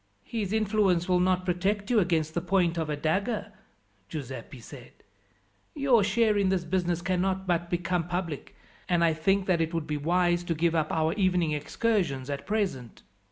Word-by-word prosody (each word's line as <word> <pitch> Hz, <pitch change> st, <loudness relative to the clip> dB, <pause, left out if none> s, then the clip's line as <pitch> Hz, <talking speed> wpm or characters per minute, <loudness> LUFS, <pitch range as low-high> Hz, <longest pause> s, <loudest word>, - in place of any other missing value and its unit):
"His 210 Hz, -5 st, -3 dB
influence 205 Hz, -5 st, +2 dB
will 180 Hz, -1 st, +3 dB
not 185 Hz, 0 st, +1 dB
protect 200 Hz, +4 st, -1 dB
you 235 Hz, -, +5 dB
against 165 Hz, -4 st, 0 dB
the 170 Hz, -, -1 dB
point 175 Hz, -1 st, +1 dB
of 160 Hz, -2 st, -2 dB
a 150 Hz, -, 0 dB
dagger," 200 Hz, +9 st, -1 dB, 0.6 s
Giuseppi 135 Hz, -3 st, -7 dB
said. 115 Hz, -, -12 dB, 0.8 s
"Your 265 Hz, -7 st, +3 dB
share 210 Hz, +1 st, +2 dB
in 195 Hz, -1 st, +2 dB
this 185 Hz, -2 st, 0 dB
business 175 Hz, -1 st, -1 dB
cannot 190 Hz, +1 st, 0 dB
but 175 Hz, -1 st, 0 dB
become 175 Hz, -1 st, -1 dB
public, 175 Hz, -4 st, -4 dB, 0.3 s
and 175 Hz, -1 st, +3 dB
I 165 Hz, -1 st, +4 dB
think 190 Hz, +5 st, +1 dB
that 180 Hz, -3 st, +2 dB
it 165 Hz, +1 st, -1 dB
would 165 Hz, -2 st, -1 dB
be 150 Hz, -1 st, -2 dB
wise 175 Hz, +3 st, +1 dB
to 165 Hz, -, -1 dB
give 165 Hz, +1 st, +1 dB
up 155 Hz, -2 st, 0 dB
our 160 Hz, 0 st, +1 dB
evening 180 Hz, -5 st, +1 dB
excursions 150 Hz, -, -1 dB
at 140 Hz, 0 st, -5 dB
present." 195 Hz, -, -2 dB
180 Hz, 175 wpm, -28 LUFS, 160-195 Hz, 0.8 s, you